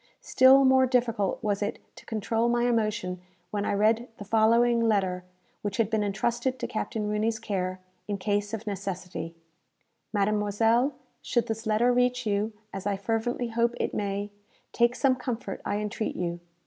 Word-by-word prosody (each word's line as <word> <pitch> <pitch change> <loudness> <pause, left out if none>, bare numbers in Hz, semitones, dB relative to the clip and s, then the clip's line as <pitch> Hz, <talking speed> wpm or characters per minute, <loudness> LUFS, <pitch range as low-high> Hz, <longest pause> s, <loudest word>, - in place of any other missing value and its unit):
Still 265 +1 +6
more 260 0 +5
difficult 235 -5 0
was 205 -1 0
it 205 - -2 0.2
to - - -15
control 225 +1 0
my 240 0 +2
emotion 215 -6 -1 0.3
when 205 -1 -1
I - - 0
read 220 +4 +2
the 205 - -8
following 230 +2 +4
letter, 195 -5 +1 0.4
which 205 -1 -3
had 225 -2 +1
been 220 -2 +1
entrusted 235 +5 -1
to - - -4
Captain 215 -1 -3
Rooney's 215 +2 0
care, 185 -4 -3 0.3
in 205 -1 -2
case 205 +1 -1
of 225 0 -5
necessity: 185 -4 -5 0.8
"MADEMOISELLE, 215 +5 +2 0.3
Should 240 -2 0
this 225 0 -4
letter 230 +3 +3
reach 250 0 +1
you, 210 +1 0 0.2
as 195 +1 -4
I 200 -1 0
fervently 230 +3 -1
hope 235 +1 +1
it - - -1
may, 205 0 -2 0.4
take 240 +1 +3
some 255 +1 +3
comfort, 245 -4 -4
I 205 - 0
entreat 210 +1 -3
you. 175 -1 -3
220 Hz, 160 wpm, -27 LUFS, 205-235 Hz, 0.8 s, Still